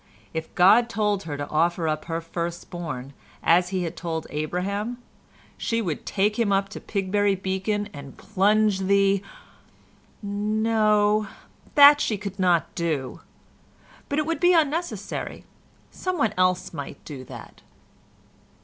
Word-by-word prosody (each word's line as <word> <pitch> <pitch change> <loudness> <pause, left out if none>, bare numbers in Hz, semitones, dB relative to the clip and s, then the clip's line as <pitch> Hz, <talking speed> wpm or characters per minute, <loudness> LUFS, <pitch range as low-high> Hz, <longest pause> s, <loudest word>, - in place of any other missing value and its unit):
If 160 0 -5
God 215 +7 +6
told 210 -4 0
her 145 -3 -4
to 145 - -4
offer 165 +1 +1
up 155 0 -2
her 165 0 -3
first 170 +1 -5
born, 145 -6 -6 0.3
as 175 +2 +4
He 185 -1 -1
had 165 - -4
told 165 -2 -4
Abraham, 195 +9 -2 0.6
she 230 -1 -1
would 175 -9 -3
take 210 +3 +1
him 220 -3 +2
up 195 0 +1
to 215 - -8
Pigbury 200 0 0
Beacon 190 +2 -2
and 140 -1 -10
plunge 210 0 +2
the—no, 195 0 +2 2.5
that 290 0 +9
she 215 - 0
could 200 0 -7
not 175 -3 +2
do, 155 -6 -3 0.9
but 285 - -1
it 305 - +1
would 330 +1 -2
be 355 0 +5
unnecessary—some 340 +3 -3
one 225 -7 +1
else 185 -1 +1
might 145 -3 -8
do 140 -4 -8
that. - - -11
190 Hz, 130 wpm, -25 LUFS, 165-210 Hz, 2.5 s, that